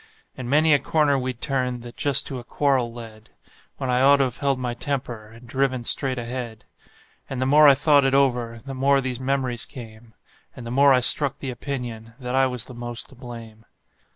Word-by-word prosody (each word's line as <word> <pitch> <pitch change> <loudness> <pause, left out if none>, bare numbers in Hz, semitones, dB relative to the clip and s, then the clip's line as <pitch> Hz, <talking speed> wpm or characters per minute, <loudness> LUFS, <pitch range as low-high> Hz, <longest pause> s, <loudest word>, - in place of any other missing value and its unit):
And 125 -2 -7
many 155 +2 +4
a 145 - +4
corner 150 -3 +1
we'd 125 -2 -5
turned 125 -3 -2
that 120 0 -11
just 140 -3 +2
to 130 - -6
a - - -10
quarrel 130 -1 0
led, 115 -2 -12 0.5
When 130 - -2
I 125 0 +2
ought 140 +1 +6
to 135 -1 +2
've 125 - -9
held 140 -2 0
my 125 -1 -3
temper, 120 -4 -4
and 115 +3 -16
driven 130 0 -1
straight 130 +2 0
ahead; 120 -2 -6 0.6
And 135 - -4
the 130 - 0
more 150 +3 +6
I 140 - +7
thought 145 0 +4
it 135 0 +2
over 125 -4 +1
the 135 +4 -9
more 135 +1 +2
these 130 -2 -4
memories 130 -2 -1
came, 110 -2 -12 0.4
And 125 - -9
the 115 - -6
more 140 +2 +5
I 130 -1 +4
struck 140 +2 +4
the 135 -3 -5
opinion 120 -3 -6
that 125 -1 -5
I 135 0 +3
was 125 -2 -5
the 130 - -11
most 120 0 -6
to 135 - -16
blame. 115 -3 -11
130 Hz, 210 wpm, -23 LUFS, 120-135 Hz, 0.6 s, I